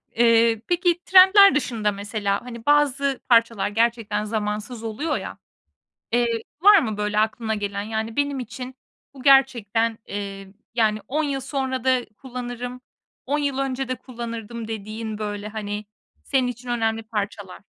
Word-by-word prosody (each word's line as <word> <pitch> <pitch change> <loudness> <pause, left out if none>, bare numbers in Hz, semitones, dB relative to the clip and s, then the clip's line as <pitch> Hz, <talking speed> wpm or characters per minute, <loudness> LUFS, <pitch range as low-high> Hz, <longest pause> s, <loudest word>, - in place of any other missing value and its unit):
Eee, 230 -1 +4
peki, 350 0 +1
trendler 385 +1 +8
dışında, 225 -7 0
mesela, 200 0 -2
hani, 235 -2 -9
bazı 280 -2 +2
parçalar 230 -4 +3
gerçekten 225 -1 0
zamansız 215 +2 -3
oluyor, 285 +8 -2
ya. - - -7 0.7
Eee, 235 -1 +1 0.2
var 410 +1 +8
mı, 220 -9 -3
böyle, 210 0 0
aklına 220 0 0
gelen? 200 -1 -3
Yani, 220 +1 -4
benim 285 -1 0
için 250 +1 -7 0.4
bu 265 -2 -12
gerçekten, 230 -5 +3
eee, 195 -1 -6 0.2
yani, 215 -2 +2
10 305 +4 0
yıl 280 -2 -1
sonra 260 -1 -3
da 255 -2 +2
kullanırım, 245 -1 -6 0.4
10 290 +3 0
yıl 280 -2 -1
önce 270 -1 -2
de 255 - -2
kullanırdım 235 -2 -7
dediğin, 220 0 -5
böyle, 210 -1 -4
hani, 210 -1 -5 0.4
senin 260 -2 +1
için 245 0 -7
önemli 225 -1 0
parçalar? 205 -3 -5
230 Hz, 140 wpm, -23 LUFS, 215-260 Hz, 0.7 s, trendler